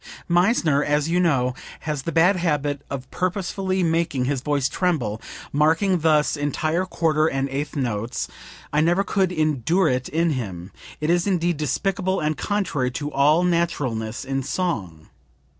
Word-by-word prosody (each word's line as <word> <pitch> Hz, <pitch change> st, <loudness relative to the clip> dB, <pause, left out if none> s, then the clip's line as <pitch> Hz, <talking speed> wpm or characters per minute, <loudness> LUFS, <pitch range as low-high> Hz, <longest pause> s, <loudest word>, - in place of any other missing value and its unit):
"Meissner, 175 Hz, -5 st, +3 dB
as 150 Hz, +1 st, +1 dB
you 175 Hz, +1 st, +2 dB
know, 135 Hz, -8 st, +2 dB, 0.3 s
has 150 Hz, -3 st, -3 dB
the 165 Hz, -, -3 dB
bad 175 Hz, +4 st, +4 dB
habit 150 Hz, -5 st, -1 dB
of 130 Hz, -1 st, -6 dB
purposely 185 Hz, +1 st, -1 dB
making 165 Hz, -6 st, +1 dB
his 135 Hz, -1 st, -1 dB
voice 140 Hz, -1 st, +1 dB
tremble, 135 Hz, -, -1 dB, 0.3 s
marking 165 Hz, +6 st, +3 dB
thus 155 Hz, -2 st, +3 dB
entire 155 Hz, +5 st, -1 dB
quarter 155 Hz, -3 st, +1 dB
and 135 Hz, -2 st, -1 dB
eighth 145 Hz, +3 st, -4 dB
notes; 120 Hz, -4 st, -2 dB, 0.5 s
I 150 Hz, -, +3 dB
never 175 Hz, +5 st, +3 dB
could 190 Hz, -1 st, +1 dB
endure 155 Hz, +2 st, +1 dB
it 130 Hz, 0 st, -1 dB
in 165 Hz, +1 st, +1 dB
him. 95 Hz, -, -5 dB, 0.3 s
It 150 Hz, +2 st, +1 dB
is 175 Hz, +2 st, +2 dB
indeed 175 Hz, -3 st, +1 dB
despicable 190 Hz, -, -1 dB
and 155 Hz, 0 st, 0 dB
contrary 185 Hz, -12 st, -1 dB
to 145 Hz, +2 st, -4 dB
all 150 Hz, +5 st, +4 dB
naturalness 145 Hz, -11 st, -1 dB
in 135 Hz, 0 st, -1 dB
song. 115 Hz, -, -3 dB
155 Hz, 150 wpm, -23 LUFS, 135-175 Hz, 0.5 s, bad